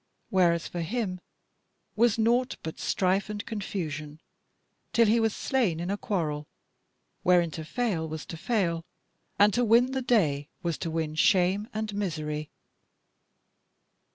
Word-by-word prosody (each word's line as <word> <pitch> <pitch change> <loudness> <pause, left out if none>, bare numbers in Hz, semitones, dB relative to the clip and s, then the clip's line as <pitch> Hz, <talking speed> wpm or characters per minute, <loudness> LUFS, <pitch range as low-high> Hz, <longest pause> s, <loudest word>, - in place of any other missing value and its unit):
Whereas 175 -4 +3
for 175 - -4
him 185 0 -2 0.7
was 230 0 +3
naught 240 +3 +2
but 160 - -6
strife 190 +2 +1
and 210 -1 -4
confusion, 155 -8 -4 0.7
till 235 - +5
he 225 +2 +4
was 225 -2 +1
slain 225 -12 0
in 175 +3 -2
a - - +1
quarrel, 155 -9 -2 0.7
wherein 175 -2 +4
to 160 - -6
fail 170 -3 -1
was 155 -1 -5
to - - -7
fail, 170 -3 0 0.5
and 205 0 +5
to 245 - +2
win 240 +3 +4
the 265 0 -1
day 155 - +2
was 170 -3 -1
to 165 - -3
win 160 -1 -2
shame 185 +5 +3
and 215 -1 -3
misery." 155 -6 -3
185 Hz, 140 wpm, -28 LUFS, 160-220 Hz, 0.7 s, till